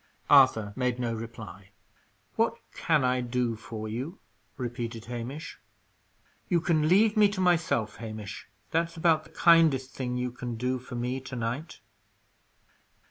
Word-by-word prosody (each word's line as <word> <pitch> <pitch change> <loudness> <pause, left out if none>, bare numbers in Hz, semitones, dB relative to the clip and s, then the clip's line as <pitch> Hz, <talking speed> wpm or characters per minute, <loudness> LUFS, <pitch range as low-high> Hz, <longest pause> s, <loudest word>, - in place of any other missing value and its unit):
Arthur 130 -7 +6
made 125 -1 0
no 120 -2 -1
reply. 110 -4 -8 0.7
"What - - +2 0.2
can 155 -4 +1
I 125 0 +2
do 120 -1 -1
for 110 0 -7
you?" 130 - -5 0.4
repeated 120 -2 -5
Hamish. 125 +7 -6 0.9
"You 175 -3 +3
can 160 -2 +2
leave 210 +4 +5
me 210 -1 +6
to 205 -1 -5
myself, 170 - +1
Hamish. 110 -3 -7 0.2
That's 165 +1 0
about 160 -1 +3
the - - -16
kindest 160 -6 +4
thing 125 -2 -3
you 125 0 -2
can 120 -1 -5
do 125 +2 -1
for 125 0 -9
me 125 +2 -2
to 130 0 -8
night." 120 +7 -4
125 Hz, 140 wpm, -28 LUFS, 115-155 Hz, 0.9 s, Arthur